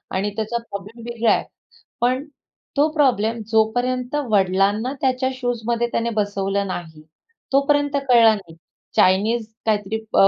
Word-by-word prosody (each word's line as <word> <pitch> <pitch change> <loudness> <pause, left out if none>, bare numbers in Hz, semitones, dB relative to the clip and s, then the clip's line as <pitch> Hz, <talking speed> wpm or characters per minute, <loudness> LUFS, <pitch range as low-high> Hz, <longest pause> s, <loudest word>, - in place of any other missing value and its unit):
आणि 195 +2 0
त्याचा 220 +2 -2
प्रॉब्लेम 225 0 -9
वेगळा 235 -1 +1
आहे. - - 0 0.6
पण 255 +3 +1 0.5
तो 290 +2 +5
प्रॉब्लेम 235 -7 +2
जोपर्यंत 245 +4 +1 0.2
वडिलांना 200 +5 +2
त्याच्या 260 0 +1
शूजमध्ये 240 -2 -1
त्याने 230 0 0
बसवलं 200 -1 0
नाही, 160 -4 -6 0.5
तोपर्यंत 285 +1 +2
कळला 230 -3 +7
नाही. 180 -6 -11 0.4
चाइनीज 215 +5 +3 0.2
काहीतरी 210 -1 0 0.2
अ, 195 - +7
225 Hz, 125 wpm, -21 LUFS, 200-250 Hz, 0.6 s, कळला